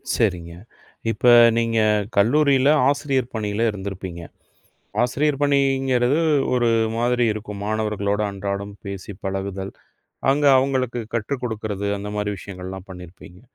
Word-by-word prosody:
சரிங்க. 90 Hz, -7 st, -1 dB, 0.6 s
இப்ப 115 Hz, +2 st, -5 dB, 0.3 s
நீங்க 115 Hz, -1 st, 0 dB, 0.4 s
கல்லூரியில 135 Hz, +5 st, +4 dB, 0.2 s
ஆசிரியர் 135 Hz, -3 st, -1 dB
பணியில 110 Hz, +1 st, -1 dB
இருந்திருப்பீங்க. 95 Hz, -3 st, -6 dB, 0.8 s
ஆசிரியர் 140 Hz, +3 st, 0 dB
பணிங்கிறது 135 Hz, -1 st, +2 dB, 0.4 s
ஒரு 120 Hz, -1 st, +2 dB, 0.3 s
மாதிரி 120 Hz, 0 st, +2 dB
இருக்கும். 105 Hz, -1 st, -7 dB
மாணவர்களோட 105 Hz, -1 st, -1 dB
அன்றாடம் 100 Hz, +1 st, -4 dB
பேசிப் 100 Hz, 0 st, -7 dB
பழகுதல், 95 Hz, 0 st, -4 dB, 0.6 s
அங்க 145 Hz, +2 st, +1 dB
அவங்களுக்கு 130 Hz, -2 st, 0 dB
கற்றுக்கொடுக்கிறது. 110 Hz, -4 st, -3 dB
அந்த 105 Hz, +1 st, -6 dB
மாரி 105 Hz, 0 st, -1 dB
விஷயங்கள்லாம் 95 Hz, 0 st, -8 dB
பண்ணிருப்பீங்க. 90 Hz, 0 st, -12 dB
105 Hz, 100 wpm, -22 LUFS, 100-125 Hz, 0.8 s, கல்லூரியில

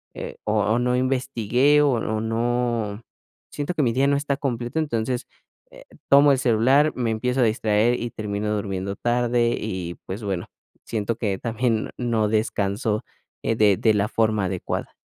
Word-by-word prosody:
eh, -, -, -7 dB
o 105 Hz, +2 st, +1 dB
no 125 Hz, 0 st, +1 dB
investigué, 130 Hz, +2 st, +2 dB
o 145 Hz, -, +4 dB
o 110 Hz, -3 st, -1 dB
no 115 Hz, -1 st, -1 dB, 0.5 s
siento 145 Hz, +4 st, -3 dB
que 150 Hz, -, +1 dB
mi 115 Hz, -3 st, +1 dB
día 135 Hz, +2 st, +2 dB
no 140 Hz, 0 st, +3 dB
está 140 Hz, 0 st, -1 dB
completo. 125 Hz, +1 st, -2 dB
Entonces, 125 Hz, -5 st, -2 dB, 0.4 s
eh, -, -, -14 dB, 0.3 s
tomo 140 Hz, +1 st, +7 dB
el 135 Hz, -, +2 dB
celular, 130 Hz, +5 st, +3 dB
me 120 Hz, -3 st, -1 dB
empiezo 125 Hz, +4 st, 0 dB
a -, -, +5 dB
distraer 110 Hz, +1 st, +2 dB
y 120 Hz, -, -3 dB
termino 105 Hz, 0 st, -3 dB
durmiendo 100 Hz, -1 st, -3 dB
tarde, 120 Hz, +1 st, +1 dB
y 95 Hz, -5 st, -4 dB
pues 100 Hz, +4 st, -5 dB
bueno, 95 Hz, -4 st, -3 dB, 0.4 s
siento 110 Hz, 0 st, -2 dB
que 100 Hz, -5 st, -1 dB
también 115 Hz, -1 st, -1 dB
no 115 Hz, -4 st, 0 dB
descanso, 105 Hz, 0 st, 0 dB, 0.4 s
eh, 115 Hz, -, 0 dB
de 105 Hz, -3 st, +4 dB
de 110 Hz, +3 st, +3 dB
la 105 Hz, 0 st, +1 dB
forma 110 Hz, -2 st, +1 dB
adecuada. 95 Hz, -1 st, -4 dB
115 Hz, 165 wpm, -23 LUFS, 105-125 Hz, 0.5 s, tomo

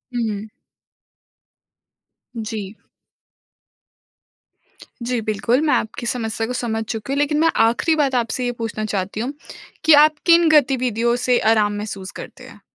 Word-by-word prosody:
हुँ। 220 Hz, -3 st, -3 dB, 1.9 s
जी। 215 Hz, -2 st, -5 dB, 2.3 s
जी, 245 Hz, 0 st, -1 dB
बिल्कुल, 215 Hz, +5 st, 0 dB
मैं -, -, +3 dB
आपकी 220 Hz, +2 st, -2 dB
समस्या 225 Hz, -2 st, -2 dB
को 250 Hz, -, -4 dB
समझ 225 Hz, -3 st, -2 dB
चुकी 220 Hz, +4 st, -5 dB
हूँ, 280 Hz, -, -1 dB
लेकिन 295 Hz, +1 st, +1 dB
मैं 330 Hz, +1 st, +4 dB, 0.2 s
आखिरी 240 Hz, +8 st, +1 dB
बात 280 Hz, -4 st, +1 dB
आपसे 245 Hz, +1 st, -1 dB
ये 245 Hz, -, 0 dB
पूछना 215 Hz, -1 st, -3 dB
चाहती 200 Hz, -1 st, -3 dB
हूँ 250 Hz, +5 st, -3 dB, 0.5 s
कि 315 Hz, -, +7 dB
आप 310 Hz, -, -1 dB
किन 340 Hz, -1 st, +5 dB
गतिविधियों 250 Hz, -5 st, +2 dB
से 250 Hz, -1 st, +3 dB
आराम 210 Hz, -2 st, +2 dB
महसूस 200 Hz, -2 st, -6 dB
करते -, -, -11 dB
हैं? -, -, -14 dB
235 Hz, 135 wpm, -20 LUFS, 215-265 Hz, 2.3 s, कि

